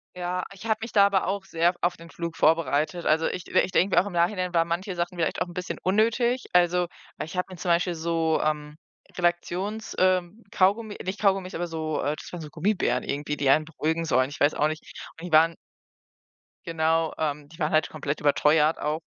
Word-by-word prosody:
Ja, 180 0 -2
ich 195 +2 -12
habe 220 -1 +1
mich 225 - -5
da 200 -2 +6
aber 195 -3 +1
auch 195 0 -2
sehr 170 0 +1
auf 175 0 +1
den 165 0 -13
Flug 170 0 -5
vorbereitet. 160 +1 +2
Also, 160 +1 +3
ich 180 - -4
ich - - +2
denke 190 +2 +2
mir - - +7
auch 200 - -6
im 190 - -7
Nachhinein 180 +1 0
waren 165 -1 +3
manche 180 +2 -3
Sachen 175 +1 -3
vielleicht 165 - -1
auch - - +1
'n 175 - -10
bisschen 180 +1 -4
unnötig, 230 +5 +2
also 180 0 +3 0.3
weil - - -4
ich 170 - -8
habe 180 - 0
mir 180 - -9
zum 180 - -4
Beispiel 175 +1 +2
so, 165 -1 0
ähm, 150 -1 -2 0.4
Relaxions 180 +5 -1
ähm, 185 +4 +1
Kaugummi 205 +3 +1
nicht 190 +2 -4
Kaugummis, 195 -2 +1
aber 175 +1 -2
so, 160 -2 -3
äh 145 +1 -1
das - - -11
waren 175 - -5
so 150 - -8
Gummibären 170 -6 0
irgendwie, 150 +1 -3
die 140 -1 +1
einen 155 +3 +5
beruhigen 160 +1 -2
sollen, 130 -3 +2
ich 145 - -9
weiß 145 +1 +4
auch 150 - +2
nicht. 155 +1 -4 0.4
Und 175 - -7
die - - -10
waren 165 +1 +5 1.1
genau, 165 -1 +1
ähm, 150 -2 -2
die 165 +3 -16
waren 150 -1 0
halt 155 0 +2
komplett 145 -1 -4
überteuert 150 +2 +3
auch. 150 +2 -1
170 Hz, 215 wpm, -26 LUFS, 155-185 Hz, 1.1 s, mir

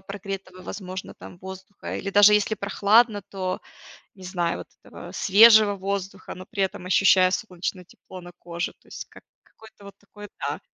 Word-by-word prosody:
прогретого, 195 -1 -8
возможно, 185 -1 -7
там, 175 - -13
воздуха 190 +1 -8
или 195 - -4
даже 205 +1 +7
если 210 +1 +1
прохладно, 205 +2 +2
то, 185 -1 -5 0.5
не 190 - -14
знаю, 175 -2 -2
вот - - -10 0.2
этого - - -11
свежего 215 +1 +6
воздуха, 195 0 -5
но 185 0 -11
при 200 -2 -3
этом, 185 -1 -6
ощущая 185 0 +4
солнечное 185 -2 -4
тепло 185 +1 -13
на 175 0 -12
коже. 170 0 -5
То - - -28
есть - - -8
как - - -17 0.2
какое-то 220 -2 -18
вот 200 - -12
такое 205 0 -13
Да. - - -3
195 Hz, 170 wpm, -24 LUFS, 185-205 Hz, 0.5 s, даже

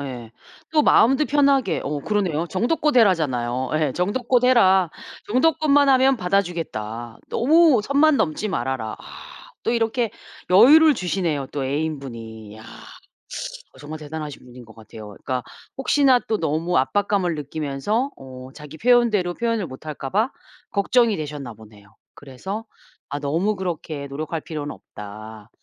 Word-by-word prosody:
예. 125 -5 -7 0.4
또 305 -1 +4
마음도 265 +6 +4
편하게 280 -2 +2
어 145 +1 -3
그러네요. 175 -3 -1
"정도껏 285 +8 0
해라."잖아요. 130 - +2
예. 155 -4 +1
"정도껏 240 +7 0
해라. 190 -8 +4 0.4
정도껏만 285 +3 +3
하면 265 0 +4
받아 195 0 +2
주겠다. 120 - -6
너무 305 -1 +4
선만 285 +4 +3
넘지 175 +4 -1
말아라." 120 - -3
아 - - -12 0.3
또 230 - +1
이렇게 230 0 0 0.4
여유를 290 +11 +7
주시네요 170 - -2
또 140 -2 -3
애인 150 +2 -2
분이. 110 -4 -9
야. 110 - -13 1.1
정말 155 +3 -8
대단하신 150 -1 -7
분인 125 -1 -13
것 110 - -16
같아요. 110 -1 -12
그러니까 125 +5 -4 0.3
혹시나 270 -1 +4
또 220 - 0
너무 165 +2 -1
압박감을 185 +2 0
느끼면서 150 - -2
어 130 -1 -10
자기 150 0 -11
표현대로 225 -5 +2
표현을 230 -4 -1
못할까 135 +1 -7
봐 220 +7 +1 0.4
걱정이 220 +1 +2
되셨나 145 -6 -6
보네요. 105 -2 -17 0.2
그래서 190 - -7 0.4
"아 145 +1 -4
너무 165 +9 0
그렇게 160 -6 -5
노력할 155 +3 -4
필요는 150 -2 -6
없다. 105 +1 -11
165 Hz, 315 characters per minute, -22 LUFS, -, 1.1 s, 여유를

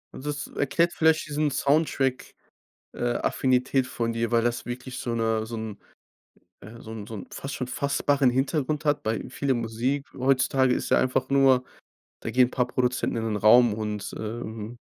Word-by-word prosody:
Das 145 +1 -4
erklärt 170 +5 0
vielleicht 160 -1 +2
diesen 150 0 0
Soundtrack 140 -2 0 0.6
äh, 120 0 -1
Affinität 130 0 +1
von 115 -2 -2
dir, 115 0 -1
weil 115 -1 +3
das 120 0 -1
wirklich 125 +1 -6
so 120 - -3
'ne 110 -1 0
so 115 +1 -6
'n 110 -2 -5 0.8
äh, 115 +3 -12
so 110 - -9
'n 105 -2 -7
so 115 - -8
'n 100 - -7
fast 135 +1 -6
schon 125 - -3
fassbaren 140 0 +1
Hintergrund 145 +4 -1
hat, 145 0 +2
bei 110 0 -1
viele 140 -2 -1
Musik 120 +4 -1
heutzutage 130 0 +2
ist - - -3
ja - - +5
einfach 130 0 0
nur: 135 -2 +4 0.6
Da - - -4
gehen 125 0 +4
paar 125 -2 0
Produzenten 125 -1 -1
in 115 - -2
'nen 110 -2 -1
Raum 110 +2 +6
und, 105 -2 -4
ähm, 110 +1 -6
125 Hz, 175 wpm, -26 LUFS, 115-135 Hz, 0.8 s, Raum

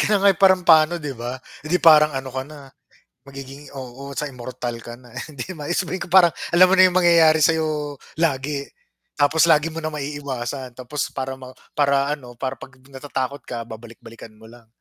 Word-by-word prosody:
Kaya 210 - +2
nga, 200 - +5
eh, - - -13
parang 190 -1 +5
paano 160 +1 +6
'di 145 -2 -4
ba? 120 +1 -4 0.3
Eh, - - -7
di - - +5
parang 150 -1 +6
ano 130 0 -7
ka 130 - -1
na 155 - -11 0.7
magiging 135 0 -10 0.2
oo, 130 +1 -10 0.2
sa 150 - -3
immortal 125 -1 -6
ka 120 - -8
na. 125 - -17 0.2
Hindi 140 -5 -7
maexplain 175 +4 -2
kung 180 - -11
parang 175 -2 +6 0.2
alam 185 +2 +7
mo - - +3
na 185 - +8
yung 180 - -4
mangyayari 165 -3 +5
sayo 160 -1 +2 0.6
lagi 140 -1 0 0.6
tapos 145 +3 +3
lagi 155 0 +3
mo 165 - -4
na 155 - -2
maiiwasan 140 -3 -5
tapos 130 +3 -5 0.2
para 130 0 -3
ma 130 - -9 0.3
para 140 -1 +3 0.2
ano 140 -4 -9
para 130 -1 -2
'pag 130 -1 -13 0.2
natatakot 135 0 -4
ka 115 -1 -5
babalik-balikan 115 0 -12
mo 110 - -16
lang. 115 0 -16
140 Hz, 190 wpm, -22 LUFS, 130-160 Hz, 0.7 s, na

